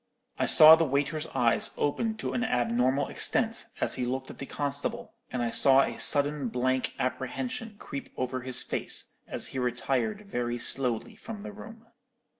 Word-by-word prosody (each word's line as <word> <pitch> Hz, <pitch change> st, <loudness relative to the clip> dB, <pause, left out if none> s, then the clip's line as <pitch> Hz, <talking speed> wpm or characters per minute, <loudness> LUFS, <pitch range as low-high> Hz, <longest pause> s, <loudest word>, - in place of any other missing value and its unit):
"I -, -, +1 dB
saw 155 Hz, 0 st, +9 dB
the 165 Hz, +1 st, +5 dB
waiter's 150 Hz, +2 st, -1 dB
eyes 120 Hz, -3 st, +1 dB
open 220 Hz, +10 st, -1 dB
to -, -, -4 dB
an 245 Hz, -, -1 dB
abnormal 125 Hz, -, +1 dB
extent, 225 Hz, -1 st, +1 dB
as -, -, +1 dB
he -, -, 0 dB
looked 130 Hz, +2 st, -4 dB
at -, -, -14 dB
the 135 Hz, -, -6 dB
constable, 145 Hz, -1 st, -3 dB, 0.2 s
and 125 Hz, -1 st, -2 dB
I 115 Hz, -, -1 dB
saw 135 Hz, +2 st, +5 dB
a -, -, -4 dB
sudden 145 Hz, -1 st, +1 dB
blank 130 Hz, +2 st, -1 dB
apprehension 220 Hz, -, -4 dB
creep 140 Hz, -8 st, -7 dB
over 130 Hz, 0 st, -2 dB
his 130 Hz, 0 st, 0 dB
face, -, -, -2 dB
as -, -, -1 dB
he 130 Hz, -, -4 dB
retired 125 Hz, -, -1 dB
very 120 Hz, -10 st, -3 dB
slowly 120 Hz, -1 st, 0 dB
from 215 Hz, -2 st, -9 dB
the 215 Hz, -, -7 dB
room. 225 Hz, +2 st, -12 dB
135 Hz, 170 wpm, -28 LUFS, 125-165 Hz, 0.2 s, saw